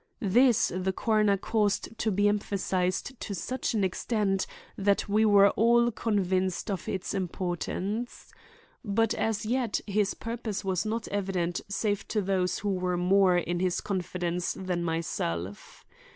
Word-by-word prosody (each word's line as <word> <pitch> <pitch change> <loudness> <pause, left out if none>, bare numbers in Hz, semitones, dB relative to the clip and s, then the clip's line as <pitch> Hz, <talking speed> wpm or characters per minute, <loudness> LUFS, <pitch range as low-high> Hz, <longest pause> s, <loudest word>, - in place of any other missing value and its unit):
This 235 +4 +4
the 185 +1 0
coroner 215 -1 +2
caused 210 +1 0
to 220 - +1
be 205 0 +2
emphasized 195 +2 -1
to 200 - -4
such 255 +7 -2
an 205 - +1
extent 195 +1 0 0.3
that 200 +1 +1
we 215 +2 +3
were 200 -1 +7
all 235 +2 +4
convinced 190 -3 0
of 190 -4 -4
its 190 -2 -3
importance. 190 +4 -3 0.5
But 225 +1 +1
as 220 -2 -1
yet 240 -1 0
his 205 -1 0
purpose 230 -3 -4
was 190 +1 0
not 225 +1 -2
evident 185 -4 -1
save 205 0 -1
to 215 - 0
those 185 -2 0
who 205 - -2
were 180 -1 -1
more 185 0 +4
in 175 0 -1
his 180 -1 0
confidence 180 -2 -2
than 180 -2 -3
myself. 100 - -3
195 Hz, 140 wpm, -28 LUFS, 180-215 Hz, 0.5 s, were